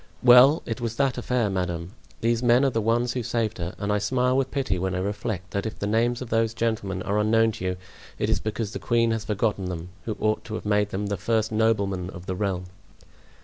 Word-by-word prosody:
"Well, 125 +5 +7
it 115 +1 -4
was 115 -1 -2
that 135 -2 +1
affair, 125 -2 0
madame; 90 -3 -3 0.3
these 115 0 +1
men 120 +2 +4
are 135 - +2
the 115 - 0
ones 120 +3 +1
who 125 - -2
saved 115 -2 -2
her; 85 +1 -4
and 105 0 -1
I 105 - +2
smile 125 +4 +1
with 135 0 +1
pity 130 -11 -1
when 95 0 -1
I - - -1
reflect 95 -1 -3
that 100 +2 -2
if 110 - -7
the - - -3
names 115 +4 +1
of 120 - -11
those 115 0 +1
gentlemen 100 -5 -1
are 105 +1 0
unknown 115 +1 +3
to 95 - -6
you 90 0 -1 0.4
it - - 0
is - - +1
because 110 0 -3
the - - -4
queen 115 -1 +2
has 115 -1 -2
forgotten 105 -2 -1
them, 90 -1 -5 0.2
who 110 - -3
ought 110 0 0
to 110 - -5
have - - -6
made 105 0 +2
them 100 +1 -3
the 100 0 -2
first 110 +3 0
noblemen 100 -5 +1
of 90 -1 -10
the 95 - -3
realm." 95 -2 -2
110 Hz, 235 wpm, -25 LUFS, 100-115 Hz, 0.4 s, Well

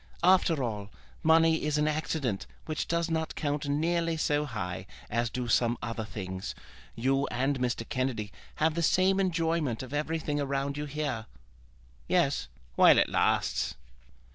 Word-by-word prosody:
"After 175 -5 +4
all, 105 -4 -3 0.3
money 160 0 +4
is 150 0 +1
an 150 0 +2
accident 150 -8 -1 0.2
which 155 -1 -3
does 170 0 0
not 160 0 -1
count 145 -1 -2
nearly 165 +3 +1
so 150 -1 +1
high 95 -7 -5 0.2
as 115 +2 +1
do 125 0 -3
some 120 0 +2
other 115 -1 -4
things. 95 -3 -5 0.4
You 135 +3 +1
and 135 +2 0
Mr. 120 -2 -1
Kennedy 130 -6 -2 0.2
have 155 +1 +2
the 170 - -1
same 185 +3 +3
enjoyment 165 - 0
of 130 +1 -9
everything 150 -1 -1
around 140 0 -1
you 150 +1 -3
here." 145 -7 -3 0.8
"Yes; - - +2 0.3
while - - +7
it - - +4
lasts." - - +1
145 Hz, 145 wpm, -29 LUFS, 120-160 Hz, 0.8 s, while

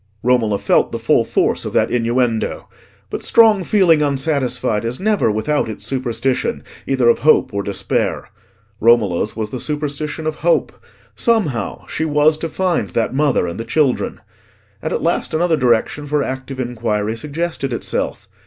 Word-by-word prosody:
Romola 115 -4 +2
felt - - +2
the - - -3
full - - +2
force - - 0
of - - -5
that - - +2
innuendo. 120 -1 0 0.4
But - - -4
strong 220 -4 +4
feeling 175 -5 +4
unsatisfied 135 -6 0
is 115 +2 -3
never 210 - +1
without 110 +5 0
its 110 - -7
superstition, 130 -1 -1 0.2
either 130 -3 +2
of 120 - +4
hope 155 -6 +3
or 100 - -1
despair. 100 -1 -2 0.5
Romola's 110 -4 +2
was 110 -1 -4
the 130 - -4
superstition 150 +2 -3
of 155 -1 -2
hope: 170 +1 +1 0.4
somehow 175 - 0
she - - -3
was 150 0 +3
to 165 - -3
find 175 - -1
that 115 +7 -1
mother 140 -8 +2
and 85 +3 -5
the - - -3
children. 130 0 0 0.6
And - - -3
at - - -2
last 170 -1 0
another 170 0 +2
direction 125 +2 +1
for 145 0 +1
active 130 0 -5
inquiry 110 -3 -2
suggested 150 +2 -3
itself. 120 - -3
130 Hz, 155 wpm, -18 LUFS, 115-155 Hz, 0.6 s, strong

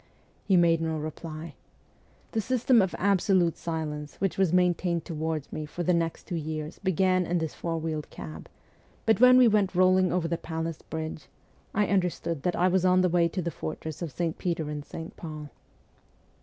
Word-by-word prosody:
He 190 - +4
made 165 -1 +4
no 160 -1 -1
reply. 155 +1 -6 0.8
The 225 - 0
system 250 0 +3
of 190 -2 -1
absolute 190 -3 +2
silence 150 -3 -4
which 195 -1 -1
was 190 -4 +2
maintained 175 -1 +1
toward 160 -2 -3
me 155 -1 -4
for 175 +3 -4
the 180 - +2
next 165 -1 -1
two 175 - -4
years 155 0 -4
began 185 -1 +2
in 175 - +1
this 160 -2 -2
four 165 -1 -3
wheeled 155 -2 -3
cab; 80 -1 -9 0.6
but 220 - +3
when 250 0 +8
we 255 -1 +7
went 205 -4 +2
rolling 185 0 +4
over 180 -2 0
the 170 0 -2
Palace 160 -1 -4
Bridge 160 -1 -6 0.5
I 210 +1 +3
understood 180 -5 -1
that 180 +3 0
I 180 - +3
was 185 0 +3
taken 180 -2 +3
to 185 +2 -3
the 170 - -2
fortress 155 +1 -6
of 170 -4 -3
St. 165 +2 -2
Peter 165 -4 -2
and 150 -1 -5
St. 160 +2 -8
Paul. 155 -3 -7
170 Hz, 180 wpm, -28 LUFS, 160-185 Hz, 0.8 s, when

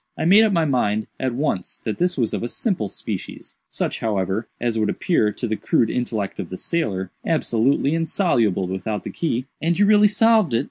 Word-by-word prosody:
I - - -2
made 200 +6 +7
up 220 - +3
my 170 -4 +2
mind, 110 -6 0
at 130 -2 -1
once, 135 -9 -2
that 110 - -3
this 180 0 +1
was 115 -4 0
of - - -2
a 120 - -2
simple 175 - -2
species—such, - - -5
however, 100 0 -1
as 115 -2 -1
would 105 -1 +1
appear, 110 -12 +1
to - - -4
the 110 -2 -1
crude 110 +1 +1
intellect 110 -5 -3
of - - -4
the 95 - -6
sailor, 95 - -2
absolutely 140 -2 +1
insoluble 120 - +1
without 95 +3 -3
the - - -6
key." 130 -7 -2 0.2
"And 170 +1 +1
you 205 - +4
really 210 0 +6
solved 215 - +3
it?" - - +3
120 Hz, 195 wpm, -22 LUFS, 105-170 Hz, 0.2 s, made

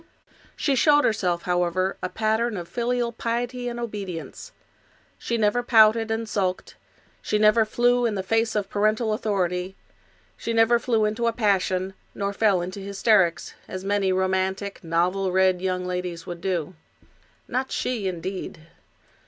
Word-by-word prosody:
She 280 - 0
showed 295 +2 +4
herself, 180 -6 0
however, 180 +1 0
a 185 - -2
pattern 220 +1 0
of 175 -1 -6
filial 240 +1 -1
piety 240 +2 -3
and 240 0 -6
obedience. 205 - -6 0.7
She 235 - -2
never 215 +2 +2
pouted 225 -1 +5
and 225 0 -2
sulked; 185 -3 -2 0.5
she 210 - 0
never 215 +1 +4
flew 245 +2 +2
in 215 - -2
the 190 - -2
face 225 +3 0
of 205 -2 0
parental 215 +2 +1
authority; 185 -3 -1 0.6
she 230 - -4
never 225 +1 +4
flew 225 -3 +1
into 220 +3 -1
a - - +3
passion, 190 -4 0 0.2
nor 200 0 -2
fell 200 -4 +2
into 185 +3 -6
hysterics, 195 -4 +1
as 185 0 -6
many 200 -1 +1
romantic, 190 +1 -1
novel 180 +3 0
read 185 -1 +3
young 185 -1 -1
ladies 180 -2 -4
would 175 -1 -7
do. 180 -3 -2 0.7
Not 260 +1 -2
she, 230 -6 -2
indeed. 185 0 -5
200 Hz, 145 wpm, -24 LUFS, 185-230 Hz, 0.7 s, pouted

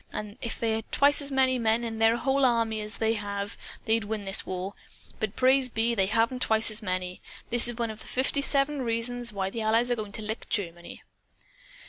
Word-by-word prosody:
And 210 +3 -7
if 230 - -3
they 230 -1 0
had 220 0 -3
twice 285 +1 +4
as 285 - -4
many 260 -1 +3
men 225 +1 +1
in 225 -1 -4
their 225 +1 +4
whole 270 +3 +1
army 230 -3 +2
as 210 +1 -3
they 225 0 +1
have, 205 -1 -4 0.3
they'd 225 0 +1
win 210 -1 -4
this 195 0 +1
war. 185 +2 -4 0.5
But 215 -1 -3
praise 260 0 +4
be, 230 +1 +1
they 195 -4 +1
haven't 230 +4 +1
twice 220 -1 +3
as 215 - -2
many! 185 -2 -3 0.3
That 240 - +1
is 240 -1 -4
one 230 -2 -1
of 215 - -11
the - - -12
fifty 270 +2 +1
seven 280 0 +2
reasons 235 0 -1
why 195 -2 -3
the 230 - -4
Allies 225 +3 +2
are - - +3
going 210 -3 -6
to 220 - -1
lick 220 +2 -5
Germany." 175 -4 -4
225 Hz, 215 wpm, -27 LUFS, 210-245 Hz, 0.5 s, twice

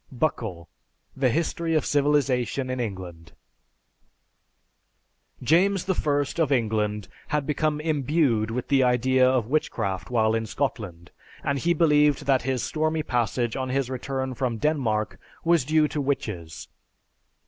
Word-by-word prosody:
(Buckle: 110 - -2 0.5
"The 135 -1 +2
History 165 +3 -1
of 155 - +1
Civilization 140 -3 +1
in 130 - -3
England.") 90 -8 -6 2.1
James 190 +4 +3
I 145 -6 +1 0.2
of 150 -3 +1
England 105 -4 0 0.2
had 150 -2 -1
become 150 +1 0
imbued 145 -7 +1
with 120 +2 -4
the 140 -2 +4
idea 130 +1 +3
of 130 -4 +1
witchcraft 110 -8 -2
while 110 -3 +2
in 110 0 -1
Scotland, 100 -10 -4 0.3
and 140 0 0
he 170 +4 +1
believed 150 -3 +3
that 135 -2 +3
his 130 0 -1
stormy 155 0 -1
passage 120 -3 -1
on 130 -1 -3
his 130 -1 -1
return 130 0 -3
from 120 -1 -2
Denmark 110 - -1 0.3
was 170 -4 +4
due 155 +1 +3
to 150 - -2
witches. 105 - -4
130 Hz, 130 wpm, -25 LUFS, 115-150 Hz, 2.1 s, the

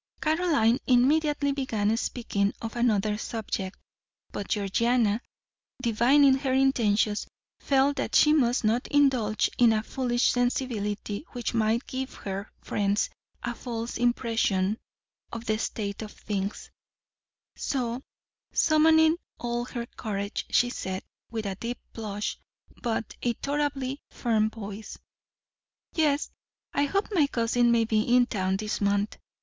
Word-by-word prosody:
Caroline 305 -8 +2
immediately 285 +3 +3
began 225 -6 0
speaking 210 -4 -1
of 225 0 -6
another 215 -3 +1
subject, 210 -5 -4 0.5
but 200 - -5
Georgiana, 220 +2 +1 0.6
divining 265 +4 +4
their 265 -1 0
intentions, 220 -6 +2 0.3
felt 275 +1 +2
that - - -2
she 300 - +6
must 250 -5 +2
not 225 +3 +1
indulge 255 -7 +2
in 240 -2 +7
a 215 -1 +1
foolish 245 0 +1
sensibility 230 -4 -1
which 245 -1 -3
might 225 +2 +1
give 260 +1 -5
her 195 +1 -5
friends 205 +1 0 0.3
a 240 - -2
false 230 -1 -5
impression 225 -4 +1 0.5
of 230 0 -6
the 215 0 0
state 200 -2 -3
of 215 -1 -6
things; 200 -1 -4 0.8
so, 245 -2 -2 0.5
summoning 320 +1 +5 0.2
all 240 0 -2
her 240 -2 -5
courage, 200 -3 -4
she 245 0 +3
said, 190 -5 -4 0.3
with 220 -2 -4
a 195 - -1
deep 235 +5 -5 0.2
blush 210 -2 -4 0.4
but 225 -2 -2
a 240 - +1
tolerably 280 -1 -2
firm 220 -3 +1
voice: 210 -1 -8 1.0
"Yes, 300 -2 +1 0.4
I 285 - +2
hope 395 +7 0
my 320 -8 +3
cousin 240 -1 +2
may 230 -1 +3
be 215 -1 +2
in 245 +2 +4
town 190 -4 -1
this 210 +1 -3
month. 200 +1 0
235 Hz, 125 wpm, -27 LUFS, 215-265 Hz, 1.0 s, in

